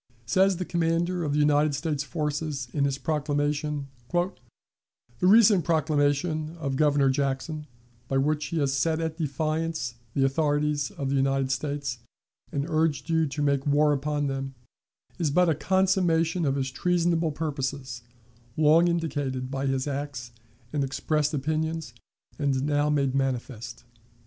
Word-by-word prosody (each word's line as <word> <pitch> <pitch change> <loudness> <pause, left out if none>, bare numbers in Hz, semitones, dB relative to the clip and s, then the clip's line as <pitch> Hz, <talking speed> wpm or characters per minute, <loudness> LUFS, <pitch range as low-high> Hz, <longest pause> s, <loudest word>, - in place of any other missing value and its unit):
Says 190 +9 +3
the 185 - -3
commander 170 +1 0
of 145 -2 -1
the - - +1
United 150 0 +3
States 150 -1 -2
forces, 150 -4 -3
in 140 -2 +1
his 140 -1 0
proclamation: 145 0 -1 0.2
"The 175 +2 +1 0.9
recent 200 -1 +6
proclamation 155 +1 0
of 140 -5 -2
Governor 145 -2 +3
Jackson, 140 +3 -2 0.4
by 135 - 0
which 150 +2 +1
he 170 - -3
has 140 -3 +1
set 160 +4 +1
at 160 0 -3
defiance 155 -2 -2 0.2
the 135 - +3
authorities 145 0 +1
of 135 -1 -4
the - - +1
United 135 0 +1
States 140 -2 -2 0.5
and 140 0 -1
urged 160 -1 0
you 160 -1 +3
to 145 +1 -3
make 140 -1 +1
war 145 +1 +4
upon 145 +1 -1
them, 135 -1 -3 0.6
is 165 -4 +1
but 180 +4 +3
a - - +4
consummation 175 0 +2
of 135 -1 +1
his 135 -1 -2
treasonable 170 +1 +1
purposes, 135 -5 -4 0.6
long 155 +3 +5
indicated 145 -6 -2
by 135 0 -2
his 135 -1 0
acts 140 -4 -4 0.4
and 145 -2 +1
expressed 150 +2 0
opinions, 155 -1 -2 0.5
and 135 -2 +1
now 145 0 +1
made 140 -3 +1
manifest." 130 -4 -3
150 Hz, 145 wpm, -26 LUFS, 135-160 Hz, 0.9 s, recent